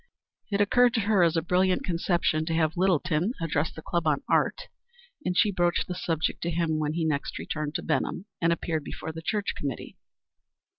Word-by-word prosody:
It 200 Hz, -, +1 dB
occurred 245 Hz, +4 st, +4 dB
to 225 Hz, -, +2 dB
her 205 Hz, -2 st, +3 dB
as 170 Hz, -1 st, +3 dB
a 165 Hz, -, +1 dB
brilliant 185 Hz, +1 st, +2 dB
conception 170 Hz, -2 st, +1 dB
to 165 Hz, -, 0 dB
have 160 Hz, 0 st, +1 dB
Littleton 180 Hz, -, +1 dB
address 160 Hz, -1 st, 0 dB
the 160 Hz, -, -10 dB
club 170 Hz, -2 st, -1 dB
on 150 Hz, -2 st, +1 dB
"Art," -, -, +1 dB, 0.6 s
and 180 Hz, 0 st, -1 dB
she 210 Hz, -, +4 dB
broached 175 Hz, -2 st, +1 dB
the 180 Hz, -, -3 dB
subject 165 Hz, -3 st, -2 dB
to 170 Hz, -, -1 dB
him 165 Hz, -2 st, 0 dB
when 150 Hz, 0 st, -1 dB
he 165 Hz, 0 st, -1 dB
next 150 Hz, -2 st, -1 dB
returned 150 Hz, 0 st, -4 dB
to -, -, -2 dB
Benham 165 Hz, +3 st, -1 dB, 0.2 s
and 165 Hz, 0 st, +3 dB
appeared 165 Hz, -2 st, -1 dB
before 160 Hz, -, -6 dB
the 165 Hz, +1 st, -8 dB
church 205 Hz, +4 st, -1 dB
committee. 140 Hz, -2 st, -5 dB
170 Hz, 195 wpm, -27 LUFS, 155-180 Hz, 0.6 s, occurred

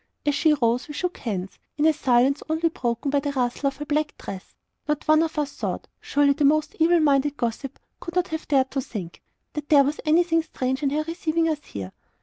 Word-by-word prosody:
As 290 Hz, -, +2 dB
she 300 Hz, +2 st, +3 dB
rose, 240 Hz, -3 st, +1 dB
and -, -, -20 dB
we 295 Hz, -, -7 dB
shook 360 Hz, +3 st, -2 dB
hands, 195 Hz, -5 st, -4 dB, 0.2 s
in 300 Hz, -, +2 dB
a 320 Hz, -, +5 dB
silence 265 Hz, 0 st, +2 dB
only 320 Hz, +1 st, +1 dB
broken 245 Hz, -1 st, -2 dB
by 285 Hz, -, +3 dB
the 280 Hz, 0 st, -3 dB
rustle 250 Hz, +1 st, 0 dB
of 275 Hz, -, -2 dB
her 295 Hz, -, -5 dB
black 295 Hz, 0 st, -1 dB
dress, 190 Hz, -1 st, -9 dB, 0.3 s
not 300 Hz, 0 st, -2 dB
one 310 Hz, +1 st, +5 dB
of 325 Hz, -1 st, -2 dB
us 295 Hz, -1 st, -1 dB
thought -, -, -4 dB
surely 285 Hz, 0 st, +2 dB
the 295 Hz, -, -1 dB
most 305 Hz, +2 st, +2 dB
evil 335 Hz, +2 st, +5 dB
minded 290 Hz, -1 st, +2 dB
gossip 240 Hz, +2 st, -3 dB, 0.2 s
could 340 Hz, -, -8 dB
not 360 Hz, 0 st, +1 dB
have 320 Hz, 0 st, -5 dB
dared 265 Hz, -2 st, +2 dB
to 275 Hz, -, -1 dB
think 190 Hz, -9 st, -7 dB, 0.3 s
that 300 Hz, -1 st, -6 dB
there 285 Hz, -2 st, +7 dB
was 290 Hz, +2 st, -2 dB
anything 330 Hz, +1 st, +3 dB
strange 265 Hz, -4 st, -3 dB
in 285 Hz, -, +1 dB
her 300 Hz, +2 st, 0 dB
receiving 330 Hz, 0 st, -1 dB
us 305 Hz, -2 st, -2 dB
here. 95 Hz, -2 st, -7 dB
290 Hz, 225 wpm, -24 LUFS, 265-315 Hz, 0.3 s, there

